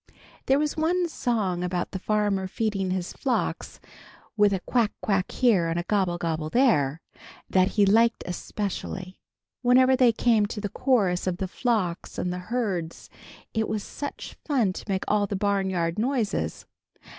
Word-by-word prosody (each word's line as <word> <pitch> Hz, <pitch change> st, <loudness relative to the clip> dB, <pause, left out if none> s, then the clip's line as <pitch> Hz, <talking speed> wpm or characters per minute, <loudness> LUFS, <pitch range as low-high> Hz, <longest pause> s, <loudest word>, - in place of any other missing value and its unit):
There 270 Hz, -, +4 dB
was 300 Hz, 0 st, 0 dB
one 345 Hz, +3 st, +1 dB
song 210 Hz, -, -1 dB
about 180 Hz, 0 st, -2 dB
the 190 Hz, -, -4 dB
farmer 205 Hz, -2 st, 0 dB
feeding 195 Hz, -2 st, -1 dB
his 185 Hz, -1 st, -2 dB
flocks, 255 Hz, -3 st, -2 dB, 0.6 s
"with 205 Hz, -2 st, +4 dB
a 195 Hz, -, 0 dB
quack, 230 Hz, -1 st, +1 dB
quack 195 Hz, -3 st, 0 dB
here, 215 Hz, -10 st, +3 dB
and 165 Hz, +1 st, -1 dB
a -, -, -2 dB
gobble, 185 Hz, -3 st, 0 dB
gobble 160 Hz, -2 st, -2 dB
there," 165 Hz, -, +2 dB, 0.5 s
that 185 Hz, -1 st, +4 dB
he 205 Hz, -, +6 dB
liked 230 Hz, +3 st, +3 dB
especially. 190 Hz, 0 st, -5 dB, 0.4 s
Whenever 255 Hz, +1 st, +5 dB
they 250 Hz, -2 st, +5 dB
came 225 Hz, -2 st, +2 dB
to 210 Hz, -, -5 dB
the 205 Hz, -1 st, -3 dB
chorus 200 Hz, -8 st, +1 dB
of 180 Hz, -1 st, 0 dB
the 190 Hz, -, -2 dB
flocks 195 Hz, -6 st, -2 dB
and 180 Hz, -, -1 dB
the 180 Hz, -, -4 dB
herds 195 Hz, -9 st, -3 dB, 0.4 s
it 220 Hz, -1 st, 0 dB
was 215 Hz, -2 st, -2 dB
such 285 Hz, -, -7 dB
fun 245 Hz, -, +1 dB
to -, -, -8 dB
make 190 Hz, 0 st, 0 dB
all 205 Hz, -1 st, +2 dB
the 200 Hz, -, -3 dB
barnyard 190 Hz, -3 st, 0 dB
noises. 220 Hz, -, -1 dB
205 Hz, 160 wpm, -26 LUFS, 185-235 Hz, 0.6 s, he